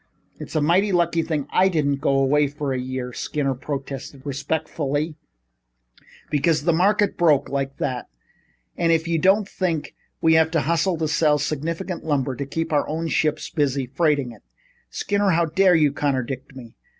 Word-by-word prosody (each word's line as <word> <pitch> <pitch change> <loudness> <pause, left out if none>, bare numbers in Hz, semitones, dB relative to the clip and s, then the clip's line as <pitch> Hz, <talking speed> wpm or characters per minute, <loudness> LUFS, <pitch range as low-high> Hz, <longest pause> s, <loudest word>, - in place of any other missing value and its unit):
"It's - - -8
a 155 - +2
mighty 185 +7 +3
lucky 170 -2 +2
thing 155 -4 -2
I 185 - +4
didn't 145 -5 +1
go 135 -1 +2
away 145 +2 +3
for 145 -1 -3
a 130 - -2
year," 125 -1 -4
Skinner 140 0 -2
protested 135 0 -6
respectfully, 145 +1 -2 1.2
"because 150 +1 +2
the 170 +1 +2
market 205 +4 +2
broke 155 -5 +3
like 135 0 -3
that 125 -2 -3 0.7
and 170 -1 +1
if 165 0 +1
you 165 -1 +1
don't 195 +4 +3
think 170 -6 -2 0.3
we 160 0 +4
have 160 0 +4
to 160 - +2
hustle 165 +4 +1
to 160 -1 -1
sell 150 -1 +3
sufficient 165 +5 -3
lumber 140 -4 -1
to 140 +2 -5
keep 165 +3 -3
our 145 - +1
own 165 +2 -2
ships 155 0 0
busy 140 -5 0
freighting 140 -1 0
it 115 - -15 0.3
" - - -38
"Skinner, 200 - 0
how 170 -1 +3
dare 180 +3 +3
you 150 -3 +4
contradict 135 -1 -3
me? 120 -3 -11
150 Hz, 175 wpm, -23 LUFS, 140-165 Hz, 1.2 s, I